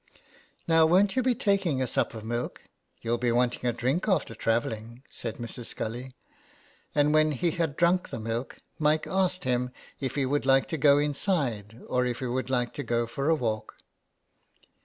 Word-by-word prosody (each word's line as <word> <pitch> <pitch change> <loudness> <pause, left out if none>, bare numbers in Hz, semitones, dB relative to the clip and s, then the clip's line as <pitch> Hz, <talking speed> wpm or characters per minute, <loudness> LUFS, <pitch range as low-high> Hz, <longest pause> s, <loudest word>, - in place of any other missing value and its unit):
'' - - -32
Now 165 -1 +5
won't 190 +5 +4
you 260 - +3
be 250 -1 +2
taking 195 -10 +1
a 130 - +1
sup 115 - 0
of 110 -1 -7
milk? 120 +2 -3 0.4
You'll 120 +1 0
be 120 0 +1
wanting 125 +1 +1
a - - +2
drink 130 - -1
after 175 - +1
travelling," 115 +2 -2
said 115 -2 -4
Mrs. 120 0 -5
Scully. 125 +3 -5 0.8
And 150 0 +3
when 155 0 +4
he 165 +6 0
had 160 -4 -2
drunk 175 +1 +2
the - - -5
milk 115 +3 -4 0.2
Mike 155 0 +2
asked 185 -1 0
him 125 0 0 0.3
if 135 - -3
he 140 -2 +1
would 145 +3 0
like 135 0 +4
to 160 - -2
go 140 0 +6
inside 140 - -1
or 125 0 +1
if 120 -1 -2
he 130 - -4
would 130 +1 -2
like 125 -2 0
to 145 - -4
go 120 -1 0
for 135 +6 -2
a 165 - +5
walk. 110 -6 -3
130 Hz, 190 wpm, -28 LUFS, 120-155 Hz, 0.8 s, go